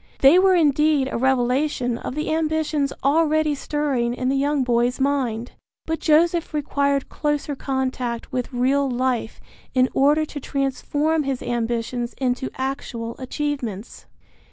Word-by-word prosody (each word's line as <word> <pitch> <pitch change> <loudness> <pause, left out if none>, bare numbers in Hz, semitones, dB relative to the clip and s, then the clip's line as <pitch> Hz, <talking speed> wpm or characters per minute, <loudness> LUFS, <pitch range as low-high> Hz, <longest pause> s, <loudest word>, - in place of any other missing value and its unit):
They 280 +7 +7
were 380 0 +5
indeed 300 -3 +3
a - - -2
revelation 255 -1 +1
of - - -5
the 305 +1 -1
ambitions 315 -3 0
already 310 +1 +3
stirring 275 -5 -1
in 255 0 -1
the 270 - +1
young 285 0 +1
boy's 245 +1 +1
mind. 255 -4 -1 0.3
But 320 0 -2
Joseph 335 +1 +2
required 280 -1 0
closer 295 -1 -2
contact 260 -3 -3
with 250 0 -3
real 270 +3 +1
life 250 -2 -1 0.4
in 255 0 +4
order 295 +3 +3
to 295 - -7
transform 290 +3 -1
his 270 -3 -3
ambitions 240 +1 -2
into 255 0 -1
actual 260 -3 -4
achievements. 260 -6 -4
275 Hz, 130 wpm, -22 LUFS, 250-300 Hz, 0.4 s, They